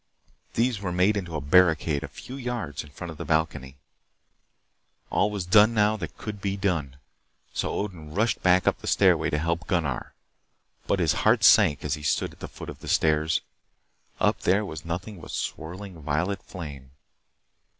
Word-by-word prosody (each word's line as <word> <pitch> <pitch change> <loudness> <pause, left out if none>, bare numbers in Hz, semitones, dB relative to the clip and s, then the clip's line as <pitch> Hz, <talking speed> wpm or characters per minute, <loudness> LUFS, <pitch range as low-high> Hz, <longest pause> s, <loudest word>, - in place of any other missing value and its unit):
These 115 -2 +1
were 90 -3 -2
made 90 +4 +3
into 90 -5 -4
a 75 - -2
barricade 80 -1 +3
a - - -4
few 130 - -10
yards 120 - -4
in 75 - -14
front 85 +3 -8
of 80 - -11
the - - -5
balcony. 80 -4 -1 1.3
All 105 - +2
was 100 -3 -4
done 105 +5 +6
now 105 0 +3
that 80 -7 -7
could 105 -2 -6
be 100 0 -1
done. 85 -9 -1 0.6
So - - -1
Odin 90 -7 -4
rushed 110 +8 0
back 90 0 +4
to - - +3
the - - -9
stairway - - +4
to 75 - 0
help 85 +4 -1
Gunnar. 85 -9 -1 0.7
But 100 - +2
his 85 -4 +2
heart 110 +1 +4
sank 95 -13 +6
as 70 - 0
he 75 - -4
stood 70 -2 0
at - - -19
the - - -6
foot - - -8
of - - -13
the - - -11
stairs. 80 +1 +2 0.8
Up - - +2
there 100 +3 +2
was 80 -5 -7
nothing 90 +3 -5
but - - -11
swirling, 90 +2 -5
violet 80 +7 -1
flame. 70 -8 -9
90 Hz, 180 wpm, -26 LUFS, 75-100 Hz, 1.3 s, done